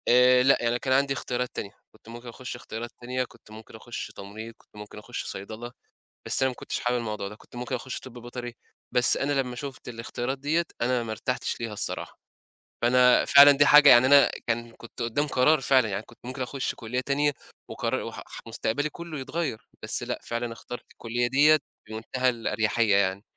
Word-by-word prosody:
آآ 125 +1 +6
لأ، 135 +1 +5
يعني 120 +1 0
كان 130 0 0
عندي 135 +1 +2
اختيارات 125 -2 -3
تانية. 100 - -5 0.2
كنت - - -19
ممكن 120 +1 -10
أخُش 125 +1 -7
اختيارات 120 -1 -7
تانية، 125 +1 -2
كنت 115 -3 -16
ممكن 110 +1 -12
أخُش 120 +2 -7
تمريض، 110 +3 -9
كنت - - -28
ممكن 105 0 -10
أخُش 120 +3 -6
صيدلة، 110 +5 -6 0.5
بس - - +3
أنا 130 - +3
ما 125 - -7
كنتش - - -4
حابب 125 0 0
الموضوع 105 -4 -4
ده. 105 - -9
كنت 110 - -18
ممكن 125 +1 -3
أخُش 125 +1 -5
طِب 130 - -12
بيطري، 120 0 -7 0.4
بس 125 0 +6
أنا 140 +1 -1
لمّا 125 -2 -6
شُفت 135 -1 -7
الاختيارات 120 +2 -4
دِيّة، 155 +5 0 0.2
أنا 120 0 +1
ما 110 - -5
ارتحتش 120 +3 -3
ليها 115 -2 -4
الصراحة. 100 - -1 0.6
فأنا 125 +1 +5
فعلًا 145 0 +9
دي 145 +1 +4
حاجة 150 0 +8
يعني 120 0 +8
أنا 140 +1 +6 0.2
كان 115 0 -2
كنت 115 - -10
قُدّام 120 +6 0
قرار 145 +2 +3
فعلًا، 130 -3 +3
يعني 100 0 -3
كنت - - -19
ممكن 130 +2 -5
أخُش 130 +1 -3
كُلّية 120 +2 -3
تانية 140 +3 +1 0.4
وقرا - - -2
وح - - -7
ح - - -10
مستقبلي 115 +5 -2
كُلّه 170 0 -8
يتغيّر، 145 -4 -4
بس - - 0
لأ - - -3
فعلًا 115 0 -4
اخترت 120 +1 -9
الكُلّية 120 +1 -2
دِيّة 150 +4 +5 0.3
بمنتهى 110 +4 -2
الأريحيّة 115 -2 +1
يعني. 100 0 0
125 Hz, 195 wpm, -26 LUFS, 115-130 Hz, 0.6 s, فعلًا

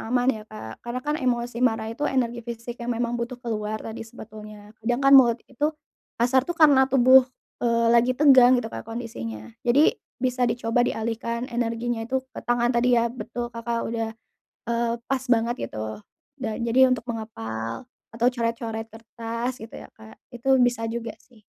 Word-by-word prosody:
aman 245 +2 +1
ya 215 -4 -5
Kak, 110 - -9
karena 240 +1 -5
kan 295 0 0
emosi 240 -2 -1
marah 225 -3 +1
itu 265 +6 -2
energi 240 -3 -1
fisik 235 +1 -7
yang 240 0 -2
memang 240 0 -1
butuh 235 +1 -4
keluar 215 -3 -3
tadi 225 - -7
sebetulnya, 215 -1 -11
sedangkan 245 +5 +2
mulut 245 -4 +8
itu, 290 +3 -1 0.5
kasar 255 +3 +2
tuh 345 - -1
karena 275 -4 +6
tubuh, 260 0 +6 0.3
eee, 235 -1 +2
lagi 240 +2 +4
tegang 260 -3 +7
gitu 225 -2 -3
Kak, - - -7
kondisinya. 115 - -6
Jadi 285 - +5 0.2
bisa 250 -1 0
dicoba 230 0 0
dialihkan 230 +2 -3
energinya 235 0 -2
itu 265 +1 -1
ke - - -7
tangan 240 0 +2
tadi 245 +1 +3
ya. 235 0 +2
Betul 240 -1 -5
Kakak 230 0 -3
udah, 225 -1 -2 0.6
eee, 235 0 0 0.2
pas 265 -1 -1
banget 235 0 +2
gitu. 110 0 -6 0.4
Dan 225 -2 -3
jadi 250 +3 +5
untuk 250 - -1
mengepal 115 - -5 0.3
atau 235 +1 +1
coret-coret 230 -2 -3
kertas 230 +2 -4
gitu 225 +1 -11
ya - - -9
Kak, 220 0 -14 0.2
itu 240 +1 -6
bisa 240 -2 +1
juga 230 -1 -5
sih. 235 -2 -23
235 Hz, 165 wpm, -25 LUFS, 225-250 Hz, 0.6 s, mulut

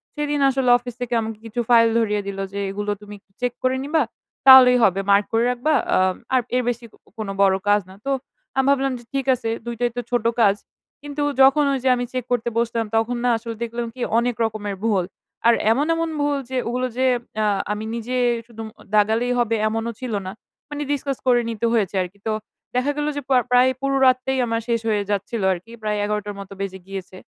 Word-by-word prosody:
সেদিন 295 -1 -1
আসলে 265 -1 +1
অফিস 245 -1 -9
থেকে 245 -1 -3
আমাকে 220 -1 -5
কিছু 225 +2 -5
ফাইল 230 -1 +6
ধরিয়ে 210 -2 0
দিলো, 195 0 -3
যে 200 - -3
এগুলো 205 +1 -3
তুমি 210 0 -10
একটু 195 - -42
চেক 245 -1 0
করে 255 0 +2
নিবা। 310 +2 +1 0.5
তাহলেই 255 -1 +10
হবে। 195 0 +3
মার্ক 200 +1 +5
করে 225 - +3
রাখবা। 250 +6 0 0.2
আ - - +4 0.4
আর 255 - +4
এর 250 - +2
বেশি 235 0 -4 0.3
কোন 220 -2 -4
বড় 195 -1 +5
কাজ 205 0 +4
না। 190 - -12
তো 275 - 0 0.5
আমি 265 - +3
ভাবলাম, 275 -1 +2
যে - - -15
ঠিক 270 -1 -1
আছে 230 -2 -4 0.2
২ 235 0 -4
টাই 245 0 +2
তো - - 0
ছোট 240 -2 0 0.2
কাজ। 200 -3 +5 0.5
কিন্তু 290 0 -3 0.2
যখন 275 +3 +6
ওই - - +1
যে, 265 - +3
আমি 245 - -2
চেক 255 -2 -2
করতে 240 -1 +1
বসতাম, 230 -1 0
তখন 225 +2 0
না 245 - +3
আসলে 230 0 -7
দেখলাম 235 0 -4
কি? 255 - -9 0.2
অনেক 240 -1 -1
রকমের 210 -2 -4
ভুল। 195 -5 +2 0.4
আর 235 - +7 0.2
এমন, 280 +6 +2
এমন 330 0 -1
ভুল 290 -1 +1
যে 260 - -2
ওগুলো 250 +2 -1
যে 260 - +2 0.4
আ - - +2 0.3
আমি 210 +1 -3
নিজে 240 +2 -3 0.3
সু 240 - -21
দুম 225 - -5 0.3
দাগালেই 220 +4 +2
হবে 230 -1 +1
এমনও 225 +1 -2
ছিল 255 -3 -4
না। 185 - -4 0.4
মানি 295 0 -4
ডিসকাস 275 -2 -2
করে 245 -1 +5
নিতে 225 0 -2
হয়েছে 205 -4 0
আরকি। 185 +2 -7
তো 220 - +1 0.4
দেখা 255 +3 +1
গেল 295 0 -1
যে, 285 - -2
প - - -4 0.2
প্রায় 250 +1 +6
পুরো 275 0 0
রাতটাই 255 +1 +2
আমার 230 0 -1
শেষ 235 -1 +1
হয়ে 210 -2 +1
যাচ্ছিল 205 +3 -2
আরকি। 185 +6 -10
প্রায় 210 -1 -1
১১ঃ০০ 210 0 -1
টার 205 -1 -5
মতো 195 0 -9
বেজে 190 -1 -4
গিয়েছে। 190 -1 -7
235 Hz, 215 wpm, -22 LUFS, 210-255 Hz, 0.5 s, তাহলেই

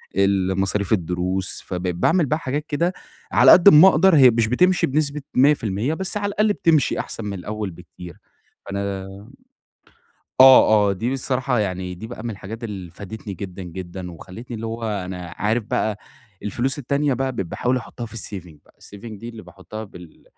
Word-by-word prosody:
ال 95 -1 +1
مصاريف 100 +1 0
الدروس، 90 +1 -2
فبقيت 90 -1 -3
باعمل 165 - +2
بَقى 155 +4 -1
حاجات 145 +3 -3
كده 170 +5 0 0.4
على - - +7
قد 180 +2 +7
أما 175 +1 +9
أقدر، 185 0 +5
هي 130 -3 +8
مش 115 -1 +1
بتمشي 180 +8 +2
بنسبة 145 +1 -1
100% 125 -2 +2
بس 190 +4 -3
على 205 0 -2
الأقل 210 +1 +1
بتمشي 160 -8 +2
أحسن 115 - -5
من 100 - -4
الأول 105 0 -5
بكتير، 90 0 -12 0.5
فأنا 100 0 -4 1.6
آه، 110 -6 +7
آه، - - +1
دي 115 +7 -2
بصراحة 130 -1 -1
يعني 90 -2 -3
دي 100 +5 -9
بَقى 120 -1 -9
من 120 - -3
الحاجات 110 +3 -8
اللي 95 -6 -7
فادتني 100 +2 -8
جدًا، 95 +1 -7
جدًا، 90 +1 -7
وخلتني 115 +8 -10
اللي 115 +1 -5
هو 115 +1 -5
أنا 90 -5 -5
عارف 110 +2 0
بَقى 110 -3 -1 0.4
الفلوس 125 +7 -1
التانية 140 +1 0
بَقى 135 +1 -2
بقيت 95 -7 -3
باحاول 125 +9 -1
أحطها 120 -1 -6
في 110 - -14
الsaving 90 -7 -7
بَقى، - - -26
الsaving 105 +1 -10
دي 115 - -8
اللي 115 -2 -11
باحطها 95 +5 -9
بال 90 -5 -14
110 Hz, 175 wpm, -22 LUFS, 95-135 Hz, 1.6 s, أما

